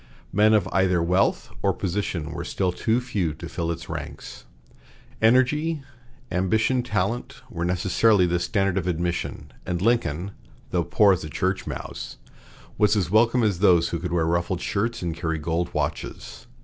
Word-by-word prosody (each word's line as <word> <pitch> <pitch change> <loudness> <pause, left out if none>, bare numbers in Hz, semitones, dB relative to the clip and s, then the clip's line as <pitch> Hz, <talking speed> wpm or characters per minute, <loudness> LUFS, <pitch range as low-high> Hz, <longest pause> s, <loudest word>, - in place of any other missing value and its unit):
Men 110 +1 +5
of 105 - +2
either 95 -1 +2
wealth 90 +3 +1
or - - +2
position 90 -4 -3
were - - -5
still 95 -2 -1
too 110 +6 +1
few 95 -11 -2
to 85 +2 -8
fill 85 0 -3
its 85 0 -4
ranks. - - -7 0.8
Energy, 135 +7 +3 0.5
ambition 110 +8 +2
talent, 120 +5 -2
were 85 -4 -3
necessarily 90 +3 +3
the 90 0 +1
standard 95 -1 0
of 90 - -5
admission; 85 -5 -3
and 90 -1 -2
Lincoln, 95 -4 0 0.4
though 90 -1 +1
poor 100 +4 +4
as 90 - -3
a 75 - -6
church 95 +5 -1
mouse, - - -6 0.6
was 105 +1 +4
as 95 -4 0
welcome 115 +3 +4
as 100 -5 +1
those 90 -4 +4
who 85 - -2
could 90 +1 -4
wear 85 -2 +1
ruffled 85 +2 0
shirts 115 +4 -2
and 85 -2 -2
carry 80 -1 -2
gold 85 +3 -2
watches. - - -4
90 Hz, 160 wpm, -24 LUFS, 85-110 Hz, 0.8 s, Men